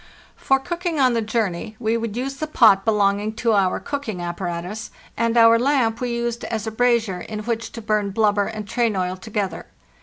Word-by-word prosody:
For 270 - +2
cooking 340 +3 -3
on 255 -2 +4
the 230 - +1
journey 215 -2 -2
we 225 -1 0
would 230 -1 -3
use 270 +2 -3
the 310 - -3
pot 215 -9 +5
belonging 210 -1 +1
to 230 0 +1
our 195 -3 +2
cooking 280 -10 -4
apparatus; 175 +4 -4 0.3
and 230 0 0
our 230 0 +7
lamp 245 -3 +1
we 250 - -1
used 235 0 -2
as 220 -1 -3
a 220 - -3
brazier 225 -5 +1
in 215 +2 -6
which 230 +1 -3
to 230 - -7
burn 210 -1 0
blubber 205 0 +2
and 215 -2 -6
train 235 -3 0
oil 185 -1 -1
together. 205 0 -4
220 Hz, 190 wpm, -22 LUFS, 205-235 Hz, 0.3 s, our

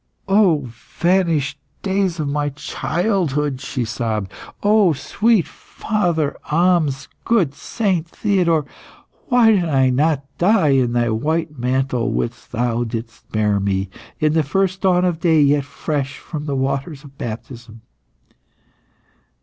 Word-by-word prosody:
"O 190 -7 +4
vanished 155 +3 0 0.2
days 190 -3 0
of 150 - -1
my 145 +1 -1
childhood!" 150 -2 -1
she 125 -3 -3
sobbed. 110 -4 -3 0.3
"O 205 -4 +4
sweet 210 - +1
father 175 -9 -2
Ahmes! 160 -4 +2 0.2
good 190 -12 +2
Saint 185 -1 -1
Theodore, 170 -7 +1 0.6
why 245 -3 +5
did 190 -5 +2
I 135 -5 +2
not 145 +1 +1
die 180 -4 +4
in 130 -3 +2
thy 120 -1 +1
white 155 +7 -1
mantle 125 -1 0
whilst 120 +1 -4
thou 120 0 0
didst 115 0 -7
bear 105 -2 +1
me, 95 -1 -1 0.3
in 155 0 +2
the 160 - +3
first 190 +6 0
dawn 180 -2 +3
of 175 -3 0
day, 165 -3 +3
yet 145 -1 +3
fresh 140 0 -3
from 150 -3 -7
the 140 - -1
waters 135 +2 -2
of 140 -2 -14
baptism!" 115 0 -7
150 Hz, 130 wpm, -20 LUFS, 130-180 Hz, 0.6 s, why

